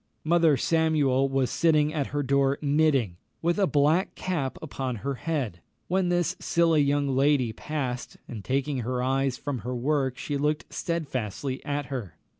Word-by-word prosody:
Mother 165 Hz, -2 st, +4 dB
Samuel 145 Hz, -3 st, +2 dB
was 135 Hz, -1 st, 0 dB
sitting 155 Hz, -2 st, +3 dB
at 145 Hz, -4 st, -1 dB
her 145 Hz, 0 st, -2 dB
door 140 Hz, +1 st, +2 dB
knitting, 140 Hz, -, +2 dB, 0.3 s
with 170 Hz, +4 st, +1 dB
a 195 Hz, -, +4 dB
black 155 Hz, +5 st, +2 dB
cap 155 Hz, -8 st, -2 dB
upon 135 Hz, -5 st, -4 dB
her 140 Hz, -, 0 dB
head, 130 Hz, -, -3 dB, 0.3 s
when 185 Hz, 0 st, +1 dB
this 175 Hz, -1 st, +1 dB
silly 165 Hz, -2 st, +3 dB
young 145 Hz, 0 st, +2 dB
lady 135 Hz, -4 st, +3 dB
passed, 130 Hz, -4 st, -4 dB
and 110 Hz, -4 st, -7 dB
taking 135 Hz, +2 st, -1 dB
her 125 Hz, +1 st, -2 dB
eyes 135 Hz, 0 st, +1 dB
from 140 Hz, -4 st, -4 dB
her 125 Hz, +3 st, -4 dB
work 130 Hz, 0 st, 0 dB
she 145 Hz, -, -3 dB
looked 150 Hz, +2 st, -1 dB
stedfastly 130 Hz, -, -3 dB
at 145 Hz, -1 st, -2 dB
her. 100 Hz, -, -5 dB
140 Hz, 160 wpm, -27 LUFS, 130-155 Hz, 0.3 s, Mother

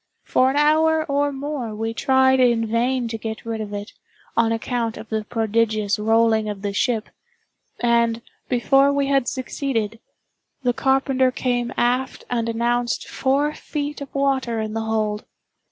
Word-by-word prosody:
For 255 Hz, +1 st, +3 dB
an 270 Hz, -, -2 dB
hour 315 Hz, +2 st, +3 dB
or 285 Hz, -1 st, +1 dB
more, 270 Hz, -5 st, -4 dB
we 225 Hz, +1 st, -3 dB
tried 265 Hz, +1 st, +3 dB
in 235 Hz, -3 st, +3 dB
vain 240 Hz, +2 st, 0 dB
to 225 Hz, -1 st, -4 dB
get 220 Hz, 0 st, -6 dB
rid 225 Hz, -1 st, -3 dB
of 210 Hz, -1 st, -6 dB
it, 205 Hz, +1 st, -6 dB, 0.4 s
on 230 Hz, -1 st, +3 dB
account 230 Hz, 0 st, -2 dB
of 220 Hz, -, -10 dB
the 220 Hz, -1 st, -2 dB
prodigious 220 Hz, -2 st, 0 dB
rolling 220 Hz, 0 st, +3 dB
of 205 Hz, -1 st, -6 dB
the 200 Hz, -1 st, -2 dB
ship; 225 Hz, 0 st, 0 dB, 0.7 s
and, 235 Hz, -1 st, +2 dB, 0.3 s
before 270 Hz, +3 st, +4 dB
we 280 Hz, 0 st, +1 dB
had 275 Hz, -3 st, +2 dB
succeeded, 235 Hz, -4 st, -2 dB, 0.6 s
the 245 Hz, -1 st, +2 dB
carpenter 265 Hz, 0 st, +2 dB
came 245 Hz, -1 st, -1 dB
aft 250 Hz, +2 st, 0 dB
and 230 Hz, -1 st, 0 dB
announced 240 Hz, +1 st, 0 dB
four 280 Hz, +3 st, 0 dB
feet 295 Hz, -1 st, -5 dB
of 280 Hz, -, -9 dB
water 265 Hz, -4 st, 0 dB
in 215 Hz, -1 st, -3 dB
the 225 Hz, -, -2 dB
hold. 215 Hz, -1 st, -1 dB
240 Hz, 155 wpm, -22 LUFS, 225-270 Hz, 0.7 s, before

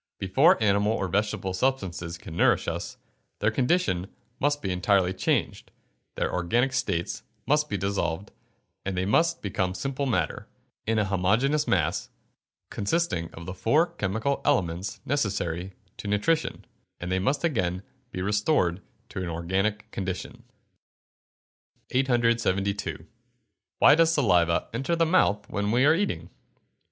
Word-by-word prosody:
Before 95 Hz, -1 st, +4 dB
animal 100 Hz, +1 st, +3 dB
or 95 Hz, -, -1 dB
vegetable 100 Hz, 0 st, -1 dB
substances 90 Hz, -7 st, -1 dB
can 80 Hz, -, -10 dB
nourish -, -, +3 dB
us, -, -, -4 dB, 0.4 s
their 105 Hz, +2 st, +1 dB
condition 125 Hz, -, +1 dB, 0.3 s
must 145 Hz, +1 st, +1 dB
be 95 Hz, -, -1 dB
entirely 95 Hz, 0 st, +2 dB
changed, 95 Hz, -, -1 dB, 0.5 s
their -, -, -1 dB
organic 120 Hz, +10 st, +1 dB
states 100 Hz, -10 st, -1 dB, 0.2 s
must 150 Hz, +3 st, +2 dB
be 105 Hz, -, -1 dB
dissolved, 95 Hz, -1 st, -2 dB, 0.5 s
and 95 Hz, -1 st, -3 dB
they 90 Hz, -, 0 dB
must 165 Hz, -, +2 dB
become 95 Hz, -2 st, -1 dB
simple 135 Hz, +4 st, -2 dB
matter, 120 Hz, -, -1 dB, 0.4 s
in 110 Hz, 0 st, +1 dB
a 105 Hz, -, +2 dB
homogeneous 110 Hz, +11 st, +1 dB
mass, 85 Hz, -5 st, 0 dB, 0.6 s
consisting 100 Hz, -, -1 dB
of 85 Hz, -, -9 dB
the 90 Hz, -, -5 dB
four 165 Hz, -, +2 dB
chemical 110 Hz, -, -1 dB
elements 100 Hz, -, 0 dB
necessary 95 Hz, -, -1 dB, 0.2 s
to -, -, -7 dB
nutrition, 105 Hz, +11 st, 0 dB, 0.3 s
and 90 Hz, +1 st, -4 dB
they 95 Hz, -, +1 dB
must 135 Hz, +9 st, 0 dB
again 95 Hz, -, 0 dB, 0.3 s
be 90 Hz, -, -4 dB
restored 105 Hz, -, +1 dB, 0.3 s
to -, -, -5 dB
an 90 Hz, -, -3 dB
organic 95 Hz, +6 st, -1 dB
condition. 95 Hz, +5 st, -5 dB, 1.5 s
872. 115 Hz, -6 st, +1 dB, 0.7 s
_Why -, -, +8 dB
does 165 Hz, 0 st, +4 dB
saliva 90 Hz, -, +2 dB
enter 135 Hz, +8 st, 0 dB
the 165 Hz, 0 st, +3 dB
mouth 105 Hz, -, +2 dB
when 100 Hz, 0 st, -2 dB
we 120 Hz, +5 st, +3 dB
are 155 Hz, -, +6 dB
eating? 200 Hz, +5 st, -2 dB
100 Hz, 135 wpm, -26 LUFS, 95-135 Hz, 1.5 s, Why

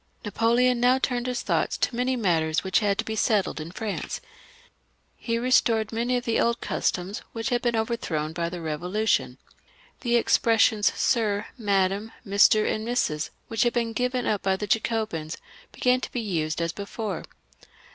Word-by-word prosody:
Napoleon 235 Hz, +4 st, +2 dB
now 250 Hz, +2 st, +4 dB
turned 250 Hz, -2 st, -1 dB
his 250 Hz, -1 st, -2 dB
thoughts -, -, 0 dB
to 240 Hz, -, 0 dB
many 250 Hz, +2 st, 0 dB
matters 165 Hz, -8 st, +1 dB
which 190 Hz, -1 st, +2 dB
had 205 Hz, -2 st, +1 dB
to 225 Hz, -, -1 dB
be 220 Hz, -, -3 dB
settled 210 Hz, -5 st, +1 dB
in 155 Hz, -, -7 dB
France. 205 Hz, +3 st, -4 dB, 1.0 s
He 230 Hz, -1 st, -2 dB
restored 230 Hz, -3 st, +2 dB
many 240 Hz, +2 st, 0 dB
of 245 Hz, -, -4 dB
the 230 Hz, -, +1 dB
old 235 Hz, 0 st, +1 dB
customs 185 Hz, +4 st, -2 dB
which 225 Hz, +2 st, -2 dB
had 245 Hz, -1 st, +1 dB
been 240 Hz, -1 st, 0 dB
overthrown 180 Hz, -9 st, -2 dB
by 170 Hz, 0 st, -2 dB
the 180 Hz, -, -6 dB
Eevo 165 Hz, +2 st, -4 dB
lution. 215 Hz, +2 st, +1 dB, 0.6 s
The 240 Hz, -2 st, 0 dB
expressions 225 Hz, -2 st, +3 dB
Sir, 210 Hz, -4 st, +1 dB
Madam, 200 Hz, -1 st, 0 dB
Mr., 205 Hz, +1 st, +4 dB
and 215 Hz, -, -1 dB
Mrs., 155 Hz, -11 st, 0 dB, 0.2 s
which 225 Hz, -1 st, -2 dB
had 240 Hz, -, +3 dB
been 235 Hz, -2 st, -1 dB
given 250 Hz, +1 st, -1 dB
up 205 Hz, -, 0 dB
by 190 Hz, -1 st, +1 dB
the 210 Hz, -, -4 dB
Jacobins, 215 Hz, -7 st, -1 dB, 0.3 s
began 250 Hz, 0 st, +2 dB
to -, -, -5 dB
be 245 Hz, -, -2 dB
used 170 Hz, -7 st, -1 dB
as 165 Hz, -, -1 dB
before. 200 Hz, -1 st, -5 dB
220 Hz, 170 wpm, -26 LUFS, 190-240 Hz, 1.0 s, now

